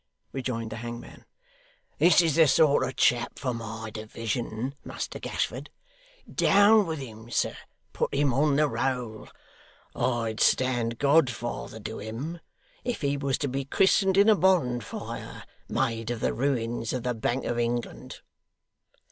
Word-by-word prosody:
rejoined 120 Hz, -4 st, -3 dB
the 110 Hz, -, -5 dB
hangman. 120 Hz, +1 st, -8 dB, 0.7 s
'This 175 Hz, 0 st, +6 dB
is 165 Hz, -3 st, +2 dB
the 160 Hz, -2 st, +6 dB
sort 145 Hz, 0 st, +4 dB
of 130 Hz, -, -3 dB
chap 120 Hz, -1 st, +2 dB
for 130 Hz, -3 st, -2 dB
my 110 Hz, -1 st, -6 dB
division, 115 Hz, +3 st, -4 dB
Muster -, -, -5 dB
Gashford. -, -, -3 dB, 0.6 s
Down 205 Hz, 0 st, +5 dB
with 160 Hz, -1 st, -2 dB
him, 115 Hz, -4 st, -9 dB
sir. -, -, 0 dB, 0.4 s
Put -, -, -1 dB
him 140 Hz, -2 st, +2 dB
on 145 Hz, +2 st, +3 dB
the 150 Hz, +1 st, +3 dB
roll. 125 Hz, -6 st, -3 dB, 0.7 s
I'd 115 Hz, -3 st, -1 dB
stand 120 Hz, -3 st, +2 dB
godfather 125 Hz, -6 st, +1 dB
to 110 Hz, +2 st, -6 dB
him, 125 Hz, +11 st, -5 dB, 0.4 s
if 245 Hz, -1 st, -3 dB
he 140 Hz, -1 st, +1 dB
was 140 Hz, -2 st, -1 dB
to 145 Hz, -, -2 dB
be 135 Hz, +1 st, -2 dB
christened 190 Hz, +6 st, +3 dB
in 200 Hz, +2 st, +6 dB
a 220 Hz, -, +7 dB
bonfire, 155 Hz, -, -1 dB, 0.3 s
made 115 Hz, -1 st, -1 dB
of 120 Hz, -2 st, -2 dB
the -, -, 0 dB
ruins 120 Hz, -3 st, -1 dB
of 125 Hz, -2 st, -3 dB
the 125 Hz, -1 st, 0 dB
Bank 120 Hz, +3 st, -2 dB
of 120 Hz, -, -1 dB
England. 120 Hz, 0 st, -3 dB
125 Hz, 145 wpm, -27 LUFS, 115-145 Hz, 0.7 s, a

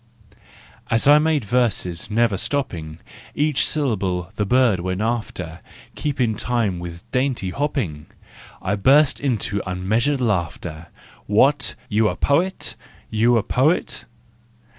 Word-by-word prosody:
As 115 Hz, +2 st, +2 dB
I 145 Hz, +1 st, +8 dB
made 155 Hz, -5 st, +1 dB
verses, 105 Hz, -6 st, 0 dB
never 115 Hz, -1 st, +2 dB
stopping, 85 Hz, -, -3 dB, 0.4 s
Each 150 Hz, -1 st, +2 dB
syllable 95 Hz, -, -1 dB
the 105 Hz, -1 st, -1 dB
bird 125 Hz, -5 st, +3 dB
went 95 Hz, +1 st, -3 dB
after, 105 Hz, -8 st, -3 dB, 0.3 s
Keeping 130 Hz, -6 st, -1 dB
in 105 Hz, -, -5 dB
time 115 Hz, -7 st, -1 dB
with 85 Hz, 0 st, -8 dB
dainty 125 Hz, -8 st, 0 dB
hopping! 110 Hz, -, -2 dB, 0.6 s
I 100 Hz, -, 0 dB
burst 140 Hz, +7 st, +4 dB
into 110 Hz, -7 st, -1 dB
unmeasured 110 Hz, +10 st, 0 dB
laughter! 85 Hz, -7 st, -2 dB, 0.4 s
What, 135 Hz, +7 st, +3 dB
you 110 Hz, +1 st, +2 dB
a -, -, -3 dB
poet? 175 Hz, +7 st, 0 dB, 0.4 s
You 115 Hz, +2 st, +3 dB
a 110 Hz, -, +1 dB
poet? 150 Hz, +8 st, 0 dB
115 Hz, 120 wpm, -22 LUFS, 95-135 Hz, 0.6 s, I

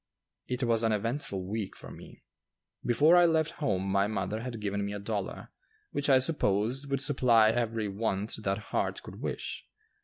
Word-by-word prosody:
It 125 Hz, +1 st, -2 dB
was 115 Hz, -2 st, +2 dB
an 115 Hz, -1 st, +2 dB
eventful 105 Hz, -3 st, -2 dB
week 105 Hz, 0 st, -4 dB
for -, -, -10 dB
me. -, -, -13 dB, 0.6 s
Before 145 Hz, +8 st, +5 dB
I 175 Hz, 0 st, +7 dB
left 160 Hz, -1 st, +1 dB
home 95 Hz, -9 st, 0 dB
my 100 Hz, +1 st, +2 dB
mother 110 Hz, +1 st, -2 dB
had 120 Hz, -2 st, -5 dB
given 100 Hz, -1 st, -2 dB
me 100 Hz, 0 st, -3 dB
a 105 Hz, -, -4 dB
dollar 100 Hz, -1 st, -4 dB, 0.4 s
which 145 Hz, +1 st, -1 dB
I 135 Hz, -, +7 dB
supposed 130 Hz, -1 st, +1 dB
would 135 Hz, -1 st, 0 dB
supply 120 Hz, -5 st, +4 dB
every 115 Hz, -2 st, -1 dB
want 100 Hz, +1 st, -2 dB
that 100 Hz, -1 st, 0 dB, 0.2 s
heart -, -, -1 dB
could -, -, -10 dB
wish. -, -, -4 dB
115 Hz, 175 wpm, -29 LUFS, 100-130 Hz, 0.6 s, I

